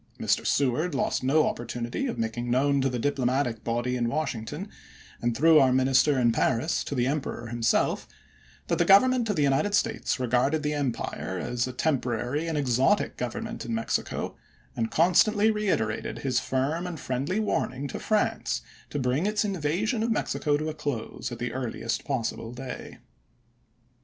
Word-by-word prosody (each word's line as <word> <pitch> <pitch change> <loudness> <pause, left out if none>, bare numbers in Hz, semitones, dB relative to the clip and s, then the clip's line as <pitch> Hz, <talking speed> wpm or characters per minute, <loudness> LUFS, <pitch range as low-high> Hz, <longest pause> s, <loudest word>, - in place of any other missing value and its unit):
Mr. - - +1
Seward 140 +4 +1
lost 135 - 0
no 150 +4 +4
op - - -2
portunity 120 - -3
of - - -4
making 115 +2 -2
known 140 +3 +2
to 135 - +2
the 125 - -2
diplomatic 130 -2 0
body 120 +2 -1
in 120 -1 0
Washington, 135 -5 -3 0.5
and 120 -1 0
through 160 +3 +6
our 130 -1 +5
minister 130 +2 +3
in 120 -2 +4
Paris 120 +6 +1
to 140 - -4
the 125 -1 +1
Emperor 130 -4 -3
himself, 120 -1 +1 0.6
that - - -1
the - - +5
Government 235 +5 +5
of 205 - +1
the 150 - +2
United 140 +9 +2
States - - 0
regarded 130 +5 +1
the 150 0 0
empire 125 -8 -3
as 120 +6 -1
a - - -4
tem 135 +1 0
porary 125 +7 -2
and 160 - -1
exotic 130 -2 +2
government - - -4
in 115 -1 -3
Mexico, 115 - -2 0.4
and 115 -1 -1
con 170 +3 +3
stantly 215 +3 +4
reiterated 115 - -1
his 125 -2 +2
firm 145 +8 -1
and 170 -3 -6
friendly 135 +10 -2
warning 145 -10 -1
to - - -6
France 215 -1 0 0.3
to - - -4
bring 135 +7 +1
its 210 0 +1
invasion 195 - -1
of 230 - 0
Mexico 150 -8 0
to 155 +1 -3
a 155 - -2
close 130 -5 -4
at 120 - -5
the 120 +1 -3
earliest 120 -2 -3
possible 115 -3 -2
day. 130 +1 -7
135 Hz, 170 wpm, -27 LUFS, 120-155 Hz, 0.6 s, through